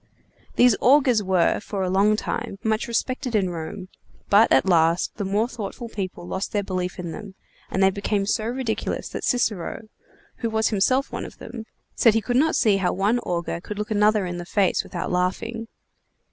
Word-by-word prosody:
These 245 -3 +5
augurs 255 -4 +5
were, 185 -3 +2
for 200 -2 -4
a 185 - -1
long 200 +3 +4
time, 230 -1 -4
much 220 0 0
respected 250 +1 -2
in 190 -4 +1
Rome, 175 +3 -6 0.4
but, 210 +3 +6
at 135 - +5
last, 170 -1 +2
the 205 - -2
more 205 +4 +1
thoughtful 235 0 -6
people 190 -5 -5
lost 190 +2 -4
their 205 -1 +1
belief 180 -2 -3
in 175 -2 -5
them, 200 +1 -9 0.3
and 190 - +1
they 190 - +5
became 200 +1 -1
so 215 +2 0
ridiculous 235 -1 -3
that - - -6
Cicero, 220 -3 -1 0.5
who 230 - -2
was 220 0 +1
himself 255 +6 +1
one - - -4
of - - -10
them, 230 -1 -8 0.3
said 230 -2 +4
he - - +4
could 245 +2 -2
not 315 +4 +3
see 210 -4 +3
how 190 -2 +1
one 205 +6 +1
augur 170 -5 -3
could 210 +3 -7
look 210 +1 -4
another 210 -1 +3
in 175 -1 -4
the 175 - -6
face 195 -3 +1
without 175 - -5
laughing. 225 +6 -2
210 Hz, 190 wpm, -24 LUFS, 185-230 Hz, 0.5 s, but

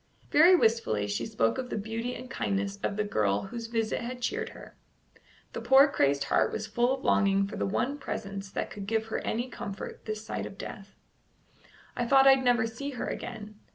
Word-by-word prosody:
Very 340 +5 +7
wistfully 220 - +2
she 105 +3 -2
spoke 115 - 0
of 250 -1 -4
the - - -3
beauty 225 +4 -3
and 255 - -8
kindness 200 -5 -2
of 200 - -2
the 210 - +1
girl 105 - 0
whose 230 +2 -6
visit 225 -1 -1
had 245 +1 -5
cheered 445 - -2
her. - - -13 0.8
The - - -4
poor 270 +2 +7
crazed 140 - +1
heart 140 - +2
was 215 - -3
full 240 +4 +1
of 265 - -14
longing 195 -1 +3
for 200 - -7
the - - -1
one 270 +8 -1
presence 200 -6 -5
that - - -4
could 200 -1 -7
give 220 0 0
her - - 0
any 240 +3 -2
comfort 200 -5 -7
this 215 0 -5
side - - -4
of 195 - -12
death. 200 -1 -9 1.0
"I 240 - -1
thought 270 +1 +6
I'd 270 -1 +6
never 245 -2 +3
see 235 +5 -5
her - - -2
again." 215 -3 -6
220 Hz, 200 wpm, -29 LUFS, 195-245 Hz, 1.0 s, Very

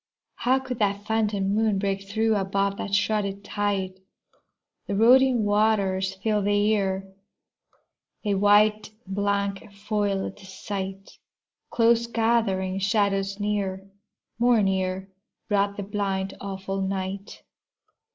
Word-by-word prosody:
How 255 +2 +2
could 260 -2 -5
that 200 -1 0
phantom 210 -3 0
moon 215 -1 +2
break 195 0 -2
through, 220 +1 +1
Above 195 0 0
that 200 - -2
shrouded 205 -1 0
tide? 200 -2 -2 0.9
The 200 - -2
roaring 245 +2 +5
waters 200 -3 +1
filled 210 +1 0
the 205 0 +2
ear, 195 -2 0 1.2
A 205 - +1
white 210 +1 +4 0.2
blank 200 +1 -2
foiled 200 -1 -2
the 195 - -14
sight. 195 0 -6 0.5
Close 235 0 +3
gathering 220 -5 +1
shadows 195 -1 0
near, 195 -2 -2 0.5
more 240 -3 +4
near, 190 0 -1 0.4
Brought 200 -1 +1
the 200 - -3
blind, 195 -1 -2
awful 195 0 -4
night. 190 +1 -4
200 Hz, 110 wpm, -25 LUFS, 195-215 Hz, 1.2 s, roaring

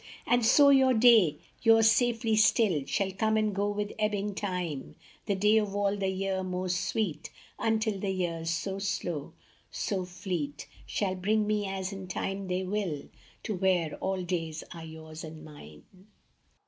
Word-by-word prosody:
And 245 0 +2
so 280 +5 +6
your 265 -2 +5
day, 220 -10 +6 0.2
yours 225 -1 +6
safely 230 -2 +2
still, 210 - +3
Shall 195 -1 0
come 220 +3 +1
and 215 -1 +1
go 200 +1 0
with 205 0 -3
ebbing 210 -1 0
time, 180 -8 -4 0.3
The 200 - +1
day 210 +3 +4
of 205 -2 0
all 200 0 +1
the 195 -1 -1
year 190 0 -1
most 180 0 -2
sweet, 170 -9 -2 0.3
Until 220 -2 0
the 195 - -2
years 170 -3 -2
so 190 +4 -2
slow, 175 -6 -3 0.4
so 190 -3 -2
fleet, 175 -5 -4 0.2
Shall 195 -3 -1
bring 210 +4 +1
me, 210 -1 0
as 190 0 -3
in 195 -1 -7
time 195 +1 -3
they 185 +1 -1
will, 185 -6 -3 0.3
To 220 - -2
where 180 -4 +1
all 190 -1 -2
days 165 -3 -3
are 165 -2 -9
yours 160 0 -9
and 155 -1 -9
mine. 75 - -13
195 Hz, 160 wpm, -29 LUFS, 175-210 Hz, 0.4 s, so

